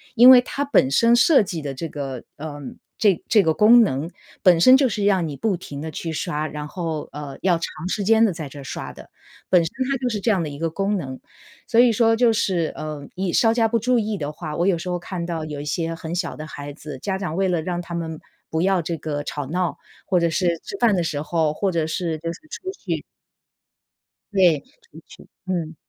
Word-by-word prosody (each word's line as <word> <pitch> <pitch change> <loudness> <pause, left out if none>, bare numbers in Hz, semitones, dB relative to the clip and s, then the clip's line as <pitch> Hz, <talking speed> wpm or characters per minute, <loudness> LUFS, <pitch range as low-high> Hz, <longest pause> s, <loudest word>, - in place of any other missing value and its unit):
因 245 +2 +9
为 255 -1 +10
它 280 +3 -3
本 205 - +3
身 230 - +5
设 265 +4 +6
计 175 -5 -4
的 140 -2 -4
这 150 +5 -5
个， 135 -5 -6
呃， 150 -1 -7 0.4
这 200 -6 +2
这 210 -4 +5
个 160 - +2
功 225 +7 +7
能 160 - 0 0.3
本 175 -3 +6
身 255 +9 +8
就 265 -2 +3
是 205 -2 -2
让 190 -4 +3
你 145 -3 -5
不 215 +2 0
停 145 -5 -8
地 160 +2 -5
去 165 +2 -5
刷， 150 -1 -2
然 150 -1 -5
后， 160 -2 -4
呃， 145 -2 -7
要 180 -2 +3
长 165 0 -5
时 200 +2 -2
间 225 +2 +5
地 205 - +1
在 160 -4 -6
这 145 +1 -10
刷 135 - -6
的， - - -14 0.4
本 180 -2 +5
身 165 - -4 0.2
它 275 - +1
就 250 - -1
是 215 -3 -2
这 220 +3 +1
样 190 -5 +1
的 155 - -4
一 140 0 -9
个 165 0 0
功 195 +5 -1
能。 130 -7 -5 0.5
所 230 - +2
以 240 -1 +6
说 225 +1 +3
就 230 0 +3
是， 180 -7 0
呃， 150 -2 -6
你 185 -1 -1
稍 225 +4 +3
加 230 -1 +2
不 230 +1 +1
注 250 +3 +2
意 215 -1 -2
的 150 -3 -4
话， 150 -1 -6
我 175 - +1
有 185 -4 +3
时 180 +2 -6
候 175 0 -1
看 175 -1 -5
到 165 -2 -3
有 150 -2 -6
一 - - -7
些 165 +2 -2
很 165 0 -6
小 175 -1 -2
的 155 - -7
孩 145 -2 -8
子， 145 -2 -9
家 190 +6 -2
长 180 -4 -4
为 195 0 +2
了 175 -3 0
让 175 +1 -3
他 170 0 -7
们 160 -2 -4 0.3
不 160 - 0
要 190 0 +2
这 165 +1 -3
个 145 -2 -4
吵 145 -1 -4
闹， 175 +2 -1 0.3
或 185 - +1
者 170 -1 +2
是 170 +3 0 0.2
吃 395 - -7
饭 225 -4 +4
的 175 - +1
时 150 -3 -2
候， 160 0 0
或 195 +5 -1
者 165 -3 0
是 160 0 -2
就 165 +1 -3
是 - - -10
出 375 +4 -6
去 - - -4 1.3
对， 180 -6 +4 0.2
出 155 - -15
去， - - -15 0.2
嗯。 170 -4 -3
170 Hz, 255 characters per minute, -22 LUFS, 155-205 Hz, 1.3 s, 为